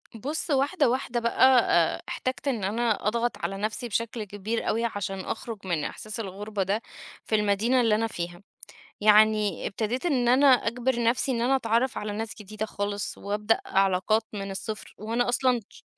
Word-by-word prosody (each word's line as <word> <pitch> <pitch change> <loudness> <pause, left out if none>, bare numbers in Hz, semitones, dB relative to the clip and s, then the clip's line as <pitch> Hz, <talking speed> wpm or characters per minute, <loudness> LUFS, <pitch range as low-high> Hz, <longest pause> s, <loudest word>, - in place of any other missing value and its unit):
بص، 290 +10 -3
واحدة 280 +1 +2
واحدة 250 -1 -1
بقى، 235 -7 +4
احتجت 255 +2 -3
إن 240 -7 0
أنا 215 +1 0
أضغط 235 +2 0
على 195 +3 -3
نفسي 215 +4 -3
بشكل 230 0 -2
كبير 205 +3 -3
أوي، 230 +2 +1
عشان 205 -3 -3
أخرُج 210 +1 -6
من 165 -4 0
إحساس 215 +1 -5
الغربة 205 0 -3
ده 200 +4 -1 0.4
في 220 - +1
المدينة 215 +5 +2
اللي 220 -2 +3
أنا 225 +1 0
فيها. 175 -3 -6 0.6
يعني 215 0 +4
ابتديت 235 - -2
إن 250 -6 +2
أنا 270 +3 +5
أجبر 245 -1 +2
نفسي 250 +3 +2
إن 235 - -1
أنا 265 +3 +3
أتعرّف 235 +1 0
على 210 0 -4
ناس 220 +1 -4
جديدة 215 +2 -5
خالص 205 -1 -3
وأبدأ 210 +2 0
علاقات 195 +3 +2
من 200 -2 -5
الصفر، 215 +2 -6
وأنا 230 +4 -1
أصلًا 250 0 +2
ش - - -17
220 Hz, 165 wpm, -26 LUFS, 205-240 Hz, 0.6 s, أنا